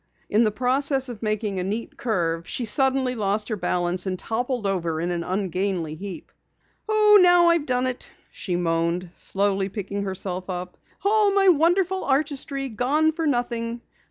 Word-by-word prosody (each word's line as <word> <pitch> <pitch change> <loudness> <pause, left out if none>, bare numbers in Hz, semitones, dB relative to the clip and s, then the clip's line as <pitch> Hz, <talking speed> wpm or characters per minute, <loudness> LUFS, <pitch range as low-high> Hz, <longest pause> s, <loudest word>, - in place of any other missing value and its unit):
In 215 +3 +4
the 215 - +3
process 265 +4 0
of 235 -4 -8
making 215 -3 -2
a - - -2
neat 210 +5 -4
curve 170 -7 -2
she 245 - -2
suddenly 265 +2 +2
lost 210 -1 -1
her 220 - -1
balance 180 -1 -1
and 185 -1 -2
toppled 245 +2 -2
over 170 -5 -1
in 175 +2 -2
an 170 -1 -2
ungainly 185 -3 -2
heap. 190 +3 -8 0.6
"Oh, 425 -1 +6
now 355 -1 +6
I've 335 -3 +2
done 250 0 +1
it!" 255 -1 -5 0.2
she 180 - -4
moaned, 170 +1 -1
slowly 195 0 0
picking 200 0 -4
herself 190 -1 -4
up. 180 0 -5 0.3
"All 420 0 +4
my 390 -1 +4
wonderful 360 +3 +2
artistry 275 -1 -1
gone 270 +7 +1
for 325 0 -2
nothing. 240 -3 -2
220 Hz, 160 wpm, -24 LUFS, 185-275 Hz, 0.6 s, Oh